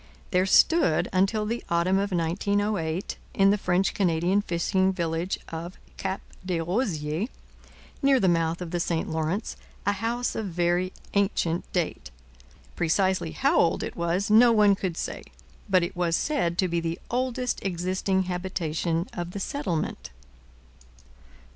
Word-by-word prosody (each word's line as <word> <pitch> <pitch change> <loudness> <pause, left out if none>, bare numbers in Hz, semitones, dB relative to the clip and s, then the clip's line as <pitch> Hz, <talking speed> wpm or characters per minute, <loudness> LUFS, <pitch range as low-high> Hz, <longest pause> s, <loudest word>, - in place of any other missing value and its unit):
There 185 0 +3
stood 195 - +4
until 195 +3 +2
the 230 +3 -3
autumn 170 +3 +2
of 200 0 -1
1908, 185 0 -1 0.2
in 195 0 +5
the - - +4
French 180 +1 +1
Canadian 180 +1 +2
fishing 190 +1 +1
village 170 0 -2
of 170 +2 -6 0.2
Cap 190 0 -3 0.2
des 180 -2 -1
Rosiers, 170 - -1 0.7
near 275 -1 +4
the 190 - +2
mouth 165 0 +1
of 170 - -7
the 175 - -1
St 170 -1 -1
Lawrence, 160 +6 -2 0.3
a 205 - +3
house 230 +5 -1
of 220 - -3
very 175 +1 0 0.2
ancient 190 -4 0
date. 175 -3 -2 0.7
Precisely 180 - +1
how - - +2
old - - +2
it - - -5
was 175 +4 0
no 235 +2 +7
one 210 -3 +5
could 185 -3 -3
say, - - -4 0.5
but 185 -2 +4
it 175 +3 -4
was 175 -2 +1
said 175 - 0
to 185 - +2
be 170 -1 0
the 165 0 -2
oldest 250 0 -1
existing 190 +1 0
habitation 175 -2 -2
of 175 0 -5
the 200 - -4
settlement. 190 - -3
185 Hz, 145 wpm, -26 LUFS, 170-200 Hz, 0.7 s, no